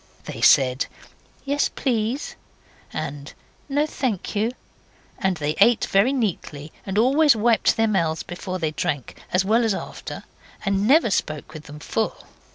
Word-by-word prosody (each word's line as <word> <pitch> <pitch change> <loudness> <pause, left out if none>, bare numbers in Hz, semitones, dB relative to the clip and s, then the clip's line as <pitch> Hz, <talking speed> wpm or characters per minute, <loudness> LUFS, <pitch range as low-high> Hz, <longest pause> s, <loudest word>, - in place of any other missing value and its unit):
They - - -7
said 130 0 +4 0.6
'Yes, 285 +1 +1
please', 240 +1 -2 0.6
and 145 0 -5 0.4
'No, 290 +2 +2
thank 250 - -3
you'; 215 +3 +1 0.7
and 190 -3 0
they 150 0 -1
ate 230 +3 +5
very 200 +7 +3
neatly, 165 - -3 0.2
and 195 +1 -2
always 275 +5 +5
wiped 225 +1 +3
their 225 0 +3
mouths 170 -6 0
before 185 +1 -5
they 160 -4 -1
drank, 145 -3 -3
as 185 +1 +2
well 225 +4 +3
as 220 -4 +1
after, - - -7 0.4
and 195 +1 +1
never 275 -4 +5
spoke 155 -3 -2
with 155 -1 -9
them 145 +1 -10
full. 220 +8 -3
200 Hz, 150 wpm, -23 LUFS, 160-235 Hz, 0.7 s, ate